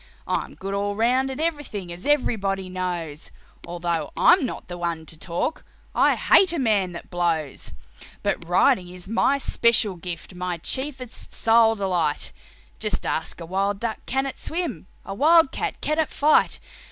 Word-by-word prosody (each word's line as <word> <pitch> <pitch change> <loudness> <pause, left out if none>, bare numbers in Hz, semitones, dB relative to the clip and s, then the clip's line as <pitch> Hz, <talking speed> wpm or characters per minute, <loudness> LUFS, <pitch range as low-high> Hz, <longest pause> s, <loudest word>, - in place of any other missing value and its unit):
I'm - - -2
good 195 +1 -5
all 200 0 -1
round 250 +5 +2
at 265 - -5
everything, 290 - -3
as 175 +9 -8
everybody 195 -10 +1
knows, 175 -4 -4 0.4
Although 170 -1 -2
I'm 330 -5 +5
not - - -7
the 175 - -6
one 170 -2 -2
to 160 - -9
talk 170 - -3 0.3
I - - +4
hate 375 -3 +5
a - - -1
man 210 - +1
that 170 - -9
blows. 165 -5 -1 0.5
"But 170 - -2
riding 180 0 +3
is 180 +1 -10
my 245 +6 +2
special 235 -6 +2
gift, 170 +1 -7
my 180 -1 -3
chiefest, 260 - -4
sole 225 0 +5
delight; 180 -7 -1 0.5
Just - - -2
ask - - -2
a 165 - -6
wild 195 +3 -1
duck 230 0 -3
can 270 +1 0
it 270 - -5
swim, 325 - -4 0.2
a 195 - -5
wild 315 +5 +5
cat - - -3
can 305 +2 0
it 315 - +1
fight. 300 +1 +3
195 Hz, 165 wpm, -24 LUFS, 175-265 Hz, 0.5 s, I'm